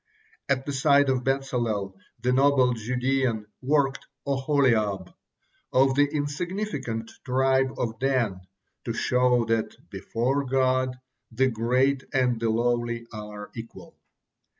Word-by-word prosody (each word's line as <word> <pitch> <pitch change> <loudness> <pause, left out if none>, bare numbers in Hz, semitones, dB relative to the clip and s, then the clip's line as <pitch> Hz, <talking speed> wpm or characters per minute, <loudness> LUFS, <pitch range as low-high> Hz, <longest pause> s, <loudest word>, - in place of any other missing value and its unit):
At 135 -1 +1
the 145 - -3
side 140 0 +4
of 130 -1 +1
Bezalel, 120 -7 -1 0.3
the 125 +1 +2
noble 135 -2 +4
Judean, 125 0 -1 0.2
worked 140 0 +1 0.2
Oholiab, 130 -9 +1 0.6
of 135 +1 +4
the 145 +2 +4
insignificant 145 - -3
tribe 130 0 +2
of 115 -2 -3
Dan, 125 -8 0 0.4
to - - -2
show 125 -1 +2
that 115 0 -1 0.2
"before 120 +8 -1
God, 130 -1 +1 0.3
the 130 +3 +2
great 130 +4 +1
and 125 -3 +2
the 115 0 0
lowly 120 0 0
are 105 -1 -8
equal." 115 -1 -10
125 Hz, 115 wpm, -26 LUFS, 115-135 Hz, 0.6 s, side